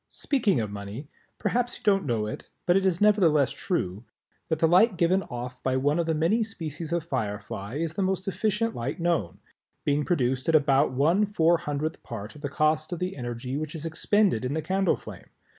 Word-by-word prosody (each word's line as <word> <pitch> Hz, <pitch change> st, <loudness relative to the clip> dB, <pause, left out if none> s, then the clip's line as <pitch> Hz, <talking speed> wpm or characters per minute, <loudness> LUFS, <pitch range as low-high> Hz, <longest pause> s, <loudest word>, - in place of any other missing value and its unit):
Speaking 220 Hz, -, +1 dB
of 105 Hz, -2 st, -3 dB
money 105 Hz, +8 st, -7 dB, 0.3 s
perhaps 245 Hz, 0 st, -1 dB
you -, -, -21 dB
don't 195 Hz, -7 st, +2 dB
know 115 Hz, -4 st, 0 dB
it, 105 Hz, -, -7 dB, 0.2 s
but 175 Hz, -, +4 dB
it 195 Hz, 0 st, +3 dB
is 180 Hz, -1 st, 0 dB
nevertheless 175 Hz, -10 st, +4 dB
true, 105 Hz, -, -2 dB, 0.5 s
that 160 Hz, -, +1 dB
the 160 Hz, -, +3 dB
light 185 Hz, +4 st, +5 dB
given 180 Hz, +2 st, +3 dB
off 125 Hz, 0 st, -6 dB
by 130 Hz, 0 st, 0 dB
one 145 Hz, +5 st, +1 dB
of 170 Hz, -, 0 dB
the 160 Hz, -, +1 dB
many 170 Hz, +9 st, +2 dB
species 165 Hz, -7 st, -4 dB
of 170 Hz, -1 st, 0 dB
Firefly 105 Hz, -5 st, -4 dB
is 160 Hz, +1 st, -2 dB
the 195 Hz, -, -2 dB
most 190 Hz, 0 st, -1 dB
efficient 215 Hz, +3 st, 0 dB
light 135 Hz, +9 st, -4 dB
known, 165 Hz, -, 0 dB, 0.5 s
being 145 Hz, +1 st, +2 dB
produced 130 Hz, -4 st, 0 dB
at 160 Hz, -, +4 dB
about 140 Hz, -2 st, +4 dB
one 165 Hz, +11 st, +2 dB
four 170 Hz, -4 st, +3 dB
hundredth 155 Hz, 0 st, -3 dB
part 110 Hz, -3 st, -7 dB
of 150 Hz, -, -13 dB
the 145 Hz, -, -3 dB
cost 155 Hz, +3 st, +1 dB
of 175 Hz, -, -2 dB
the 180 Hz, +2 st, -3 dB
energy 120 Hz, +1 st, -4 dB
which 155 Hz, +2 st, -4 dB
is 160 Hz, 0 st, -6 dB
expended 175 Hz, -, +2 dB
in 130 Hz, +3 st, -2 dB
the 160 Hz, -, -1 dB
candle 190 Hz, +3 st, +1 dB
flame. -, -, -11 dB
160 Hz, 205 wpm, -27 LUFS, 130-185 Hz, 0.5 s, light